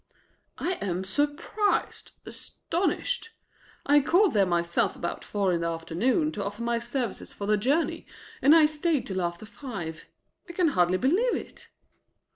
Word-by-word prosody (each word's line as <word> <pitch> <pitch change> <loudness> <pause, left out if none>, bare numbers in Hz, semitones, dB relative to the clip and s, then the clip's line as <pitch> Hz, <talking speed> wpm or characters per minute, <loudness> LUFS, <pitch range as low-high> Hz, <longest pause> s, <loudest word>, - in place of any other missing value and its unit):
"I 365 +1 -2
am 185 -2 -2
surprised, 290 - -1
astounded. 435 +6 -3 0.6
I 290 +1 +6
called 360 +7 +3
there 200 -3 +3
myself 175 +4 +1
about 170 - -4
four 200 -3 0
in 170 - 0
the 170 - 0
afternoon 175 - 0
to 205 - -4
offer 205 +3 -5
my 235 0 0
services 240 -2 -4
for 200 - -6
the 210 +1 +3
journey, 270 +11 0 0.3
and 290 +4 +7
I 330 - +7
too - - +6
stayed 305 -2 0
till 190 -1 -3
after 175 +3 -3
five. 200 - -7 0.4
I - - -7
can 345 -2 +2
hardly 180 -7 +2
believe 365 - +2
it." - - -8
235 Hz, 155 wpm, -27 LUFS, 185-310 Hz, 0.6 s, and